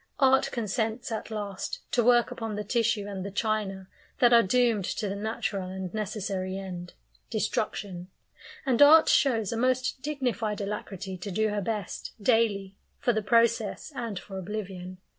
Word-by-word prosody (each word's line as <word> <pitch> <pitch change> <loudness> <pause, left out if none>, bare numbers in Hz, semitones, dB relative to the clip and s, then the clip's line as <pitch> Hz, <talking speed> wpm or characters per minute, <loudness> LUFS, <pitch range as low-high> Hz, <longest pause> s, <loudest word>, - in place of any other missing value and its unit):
Art 265 0 +4
consents 225 +1 -2
at 220 - -4
last 205 -3 -4
to 240 - +3
work 240 0 +4
upon 225 -2 -4
the 210 - -3
tissue 225 -1 +1
and 195 -2 -5
the 200 - -4
china 200 -2 -2 0.3
that 240 -1 +5
are 235 - +8
doomed 230 -2 +2
to 210 - -2
the 195 - -3
natural 200 -2 -3
and 190 -1 -5
necessary 195 -3 -3
end 180 -2 -7 0.3
destruction; 200 -4 -2 0.6
and 260 -2 +2
art 310 +3 +9
shows 225 -8 +3
a 230 - -2
most 255 +2 +1
dignified 250 -7 -2
alacrity 195 -2 -5
to 200 - -5
do 215 +3 +1
her 205 0 -1
best, 210 -1 -4
daily, 205 -4 +2 0.2
for 240 - +1
the 220 - 0
"process," 230 +3 +2
and 230 -6 -4
for 190 +1 -7
oblivion. 185 -2 -6
215 Hz, 160 wpm, -28 LUFS, 195-235 Hz, 0.6 s, art